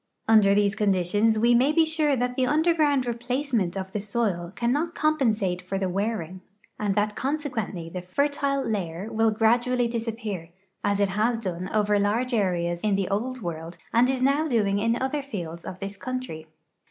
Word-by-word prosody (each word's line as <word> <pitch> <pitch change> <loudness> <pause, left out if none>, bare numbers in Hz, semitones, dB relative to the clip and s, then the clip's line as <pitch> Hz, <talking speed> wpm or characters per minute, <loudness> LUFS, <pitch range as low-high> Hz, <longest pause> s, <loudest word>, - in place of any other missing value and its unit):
Under 210 -3 +6
these 205 -1 +3
conditions 205 +1 +2
we 235 +2 +4
may 255 +5 +4
be 320 +1 +4
sure 310 -3 +2
that 250 0 -1
the 255 0 +1
underground 300 -3 +2
replace 245 +4 -3
ment 190 -5 +1
of 190 0 -5
the 210 - -2
soil 200 -5 -1
cannot 290 +8 0
compensate 225 -12 +1
for 185 +2 -4
the 190 - -1
w'earing, 185 -2 -2 0.4
and 205 -2 0
that 210 0 0
consequent!}' 245 - -3
the 180 - -4
fertile 275 +7 0
layer 190 -2 -3
will 225 0 +3
gradually 240 +3 +2
disappear, 225 -7 -4 0.3
as 200 0 +1
it 200 -1 +2
has 220 +5 +1
done 185 -4 -4
over 210 -1 +2
large 230 +5 0
areas 175 -5 0
in 210 -2 +1
the 195 -1 -1
Old 245 +4 -2
World 165 0 -5 0.2
and 240 +2 +4
is 260 -1 0
now 285 +4 +2
doing 205 -7 +1
in 230 +3 +1
other 265 +3 -1
fields 170 -11 -6
of 185 - -6
this 195 0 -6
country. 195 -8 -5
220 Hz, 175 wpm, -25 LUFS, 195-255 Hz, 0.4 s, Under